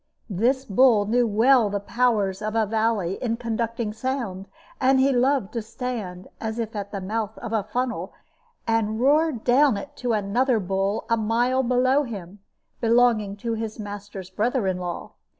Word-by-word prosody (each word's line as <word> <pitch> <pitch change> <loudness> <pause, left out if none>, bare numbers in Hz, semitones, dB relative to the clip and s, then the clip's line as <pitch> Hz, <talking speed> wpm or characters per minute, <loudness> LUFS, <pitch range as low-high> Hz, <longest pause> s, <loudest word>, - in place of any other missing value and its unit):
This 250 +8 +1
bull 220 -1 +4
knew 240 +3 +2
well 225 +1 +4
the 200 0 -2
powers 210 -3 0
of 215 +1 -3
a 225 -1 +3
valley 215 -4 0
in 230 -2 -1
conducting 230 -1 -2
sound; 225 -5 -3 0.3
and 265 0 +4
he 270 +1 +4
loved 255 -3 +1
to 230 - -2
stand, 215 -6 -5
as 220 0 -4
if 225 -1 -4
at 200 -1 -5
the 200 - -4
mouth 215 +3 -3
of 235 -2 -6
a 220 - +2
funnel, 240 +4 -3 0.5
and 220 -1 0
roar 300 +5 +4
down 250 0 +3
it 200 - -8
to 245 -2 -1
another 225 +4 +1
bull 195 +2 -1
a 230 - +2
mile 240 +4 +1
below 255 +2 +3
him, 205 -7 -7 0.4
belonging 230 -4 +3
to 230 +3 -3
his 220 -1 -4
master's 205 -2 -7
brother 235 +4 0
in 185 -1 -1
law. 175 -1 -5
225 Hz, 170 wpm, -24 LUFS, 205-245 Hz, 0.5 s, bull